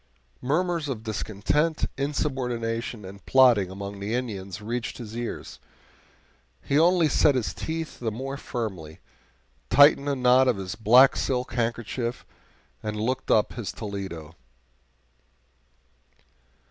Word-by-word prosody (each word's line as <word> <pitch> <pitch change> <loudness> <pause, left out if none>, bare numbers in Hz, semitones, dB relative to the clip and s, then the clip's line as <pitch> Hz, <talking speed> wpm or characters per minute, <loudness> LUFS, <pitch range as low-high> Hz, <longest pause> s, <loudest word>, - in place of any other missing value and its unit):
Murmurs 165 +2 0
of 115 -5 -4
discontent, 110 +9 -1
insubordination, 125 -6 -2
and 100 +1 -11
plotting 120 -8 +5
among 100 +1 -7
the 105 +4 -2
Indians 100 -6 -4
reached 115 +3 -4
his 115 -3 -8
ears; 120 0 -6 1.0
he 140 - +2
only 170 0 +4
set 145 0 +3
his 125 -4 -1
teeth 160 0 -5
the 115 - -1
more 135 +5 -5
firmly, 95 - -5 0.7
tightened 145 +1 +6
the 140 - +1
knot 130 0 +4
of 125 -5 +2
his 95 -1 -5
black 120 +5 +6
silk 125 -1 -2
handkerchief, 120 0 -2 0.6
and 105 0 -4
looked 130 +4 -2
up 105 - +3
his 115 -3 -5
Toledo. 95 -7 -7
120 Hz, 120 wpm, -26 LUFS, 105-135 Hz, 1.0 s, tightened